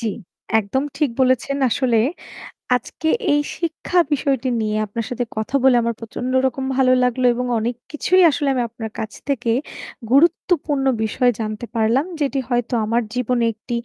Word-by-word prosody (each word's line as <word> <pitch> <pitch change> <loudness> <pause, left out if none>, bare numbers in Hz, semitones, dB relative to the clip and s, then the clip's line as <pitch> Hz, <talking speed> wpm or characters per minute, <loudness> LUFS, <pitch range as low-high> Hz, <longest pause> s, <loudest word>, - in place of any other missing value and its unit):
জি, 230 - -3 0.5
একদম 220 +6 -1
ঠিক 295 -4 +1
বলেছেন 260 +2 +2
আসলে 240 -2 +1 0.8
আজকে 250 +6 -4 0.2
এই 290 0 +3 0.2
শিক্ষা 340 +2 -1
বিষয়টি 270 -3 0
নিয়ে 215 0 -1
আপনার 220 +2 -4
সাথে 245 0 -2
কথা 220 +5 -2
বলে 265 -2 +6
আমার 235 -1 -1
প্রচণ্ড 240 +2 -5
রকম 265 +1 -1
ভালো 255 -1 +4
লাগলো 250 +1 +1
এবং 250 +1 -2
অনেক 235 +2 -2 0.2
কিছুই 365 +5 +3
আসলে 290 -1 -1
আমি 250 - 0
আপনার 220 -1 -7
কাছ 220 -1 -4 0.2
থেকে 245 -4 0 0.6
গুরুত্বপূর্ণ 295 -2 +2 0.2
বিষয় 245 +3 +2
জানতে 215 +1 -4
পারলাম 230 +6 +2 0.2
যেটি 275 -1 0
হয়তো 245 0 -1
আমার 230 +2 +1
জীবনে 250 -1 0
একটি 230 +3 -6
250 Hz, 155 wpm, -20 LUFS, 230-275 Hz, 0.8 s, বলে